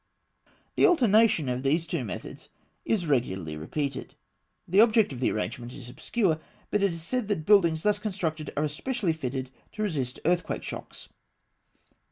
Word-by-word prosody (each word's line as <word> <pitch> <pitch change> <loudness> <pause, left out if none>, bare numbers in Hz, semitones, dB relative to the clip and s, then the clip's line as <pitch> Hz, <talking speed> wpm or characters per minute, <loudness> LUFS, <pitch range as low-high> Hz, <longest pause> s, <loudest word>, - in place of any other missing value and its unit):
The - - +6
alternation 225 - +4
of 125 0 -1
these 155 +5 +1
two - - -2
methods - - -7 0.4
is 205 -6 +1
regularly 95 - -1
repeated. 135 - -4 0.5
The 190 +4 +5
object 220 - +4
of 125 - -7
this 125 - +2
arrangement 120 +3 -4
is 125 -4 -10
obscure; 160 - 0 0.3
but 210 - +2
it 200 -2 +3
is 165 -1 -6
said 250 +4 -2
that 195 -7 -1
buildings 170 -6 +4
thus 210 -1 +2
constructed 165 -8 -3
are 150 - +2
especially 175 - -1
fitted 130 -3 -4 0.2
to 215 - -3
resist 135 -11 -2
earthquake 175 +2 0
shocks. - - -8
160 Hz, 155 wpm, -27 LUFS, 130-210 Hz, 0.5 s, The